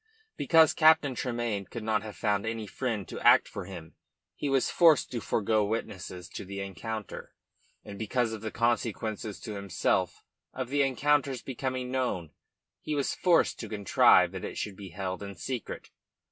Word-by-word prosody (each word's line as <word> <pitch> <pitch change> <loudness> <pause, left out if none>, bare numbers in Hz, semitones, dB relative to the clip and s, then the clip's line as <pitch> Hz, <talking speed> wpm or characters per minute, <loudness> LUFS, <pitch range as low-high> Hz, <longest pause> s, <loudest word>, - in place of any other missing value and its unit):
Because 160 -2 +5
Captain 155 -3 +5
Tremayne 120 -5 -2
could 115 +2 -7
not 110 -1 +1
have 110 -1 -8
found 105 -2 0
any 110 -1 -3
friend 110 -3 -3
to - - -7
act - - +6
for 100 - -7
him, 85 -4 -9 0.4
he 145 - -3
was 135 -1 +2
forced 165 -4 +5
to 120 -3 -3
forgo 110 0 +1
witnesses 95 -4 -4
to - - -7
the 100 +1 -7
encounter, 105 +2 -6 0.5
and 100 -1 -9
because 115 +1 0
of 110 - -6
the 110 - -3
consequences 110 -2 -1
to 110 - -6
himself 100 -1 -1 0.3
of 130 -1 -4
the 145 +1 +2
encounter's 135 -1 +1
becoming 130 -1 -3
known, 105 -12 -2 0.5
he 150 - -3
was 140 -2 0
forced 175 -2 +2
to 110 - -6
contrive 100 -3 +4
that - - -7
it - - -5
should 100 - -4
be 95 -1 -9
held 95 +1 -4
in 100 -1 -7
secret. 120 +6 -6
110 Hz, 170 wpm, -29 LUFS, 100-130 Hz, 0.5 s, act